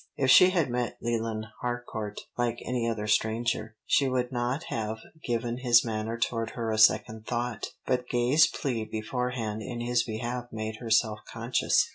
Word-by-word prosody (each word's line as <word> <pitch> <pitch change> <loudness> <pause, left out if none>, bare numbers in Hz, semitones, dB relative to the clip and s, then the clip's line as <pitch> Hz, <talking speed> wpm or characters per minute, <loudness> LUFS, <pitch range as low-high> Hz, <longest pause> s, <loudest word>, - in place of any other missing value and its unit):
If 130 -1 +3
she 185 - +9
had 170 -9 +1
met 120 -1 -2
Leland 115 -2 -2 0.2
Harcourt 120 -4 -4
like 120 -1 0
any 120 -2 0
other 110 -2 -2
stranger, 110 +1 0
she 135 -2 +3
would 125 0 -1
not 125 +3 -1
have 110 -1 -2 0.3
given 120 0 -2
his 120 -2 +5
manner 110 0 -2
toward 115 -1 -1
her 115 -1 -1
a 110 - 0
second 110 0 +4
thought; 120 -1 -2 0.2
but 125 -1 0
Gay's 130 +7 +4
plea 125 -9 -2
beforehand 110 0 -3
in 120 +2 -5
his 120 0 +1
behalf 120 +2 -3
made 110 0 -4
her 115 0 -7
self 110 -1 +3
conscious. 115 +2 +2
120 Hz, 165 wpm, -28 LUFS, 110-125 Hz, 0.3 s, she